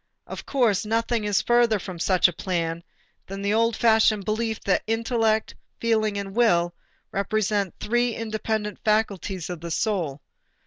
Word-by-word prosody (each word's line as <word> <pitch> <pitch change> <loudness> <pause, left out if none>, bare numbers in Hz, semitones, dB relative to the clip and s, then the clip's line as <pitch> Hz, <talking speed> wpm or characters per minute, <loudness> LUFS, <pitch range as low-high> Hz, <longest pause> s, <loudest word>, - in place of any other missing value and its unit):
Of - - -8
course, 235 -8 +2
nothing 225 0 0
is 205 -2 +1
further 240 -2 +3
from 185 -2 -8
such 185 +1 +4
a 180 - -4
plan 170 -1 -2 0.4
than 195 +1 -6
the 200 +1 +1
old 230 +1 +2
fashioned 220 -3 +3
belief 220 +1 -1
that 195 - +1
intellect, 225 -1 0 0.3
feeling, 220 -3 +1
and 195 0 -5
will 175 -8 +3 0.4
represent 200 -1 -1
three 240 +1 0
independent 215 -2 -3
faculties 200 -4 0
of 175 -3 -6
the 170 - -6
soul. 170 - -1
215 Hz, 145 wpm, -24 LUFS, 190-225 Hz, 0.4 s, such